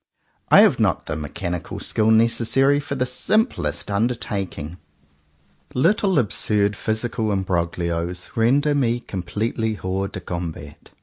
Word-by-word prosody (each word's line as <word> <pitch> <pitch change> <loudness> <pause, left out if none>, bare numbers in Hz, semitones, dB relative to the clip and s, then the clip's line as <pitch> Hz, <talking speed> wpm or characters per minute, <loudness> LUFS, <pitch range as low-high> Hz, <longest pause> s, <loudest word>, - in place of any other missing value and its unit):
I - - +8
have - - +4
not - - +1
the - - -3
mechanical 85 +3 -5
skill 110 0 +1
necessary 115 +5 +3
for 140 -1 -4
the 125 -2 0
simplest 215 - 0
undertaking. 100 -7 -2 1.0
Little 190 +5 +2
absurd 105 -3 +1
physical 110 0 -2
imbroglios 85 -2 -2
render 140 +6 +3
me 120 -4 +1
completely 110 +3 -3
hors 95 0 -2
de 100 - -7
combat. 85 -5 -7
105 Hz, 115 wpm, -22 LUFS, 90-125 Hz, 1.0 s, I